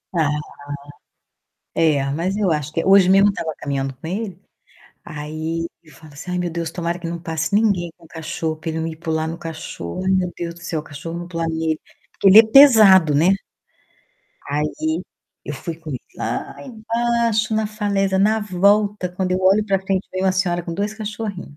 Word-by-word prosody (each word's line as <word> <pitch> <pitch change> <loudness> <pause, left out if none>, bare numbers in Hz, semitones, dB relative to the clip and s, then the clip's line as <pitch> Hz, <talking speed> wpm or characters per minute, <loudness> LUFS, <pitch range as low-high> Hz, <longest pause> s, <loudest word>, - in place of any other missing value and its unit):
Ah. 160 -3 +3 1.5
É, 150 -4 +3
mas 175 +7 -1
eu 195 -5 +1
acho 150 -1 -2
que 165 - -1
hoje 195 -1 +6
mesmo 195 +1 +6
eu - - -1
tava 160 -4 -4
caminhando 135 -2 -3
com 135 - -13
ele, 195 -1 -4 0.7
aí 155 +2 -4 0.2
eu 155 - -19
falo 155 -2 -15
assim: 160 +5 -8
"Ai, 180 - -1
meu 175 -1 -1
Deus, 165 -1 -3
tomara 170 0 -3
que 170 - -5
não 170 0 -4
passe 165 +3 -2
ninguém 200 -6 +2
com 170 -2 -18
cachorro 160 -1 -4
pra 160 +1 -5
ele 160 - -3
não 160 - -2
ir 160 - -7
pular 160 -1 -2
no 165 +1 -5
cachorro. 160 - -6
Ai 190 - +1
meu 185 -2 +1
Deus 170 -1 -4
do 175 - -15
céu, 170 -2 -3
o - - -11
cachorro 160 +4 -7
não 175 0 -7
pular 165 -2 -2
nele". 160 -1 -1 0.4
Porque 195 - +6
ele 195 +3 +9
é 225 - +11
pesado, 215 - +8
né. 155 +5 +4 1.2
Aí 150 +1 0 0.8
eu 150 - -5
fui 160 +4 -6
com 160 -2 -9
ele 130 - -3 0.2
lá - - -3
embaixo, 230 -2 0
na 220 0 +1
falésia. 200 -2 0
Na 215 +2 +3
volta, 200 0 +2
quando 180 +1 -2
eu 185 - 0
olho 195 +3 +4
pra 195 -2 +1
frente, 190 0 -1
vem 185 - -2
uma 190 -1 +3
senhora 175 -2 0
com 170 - -5
2 205 +3 -2
cachorrinho. 210 -7 -6
175 Hz, 200 wpm, -21 LUFS, 160-200 Hz, 1.5 s, é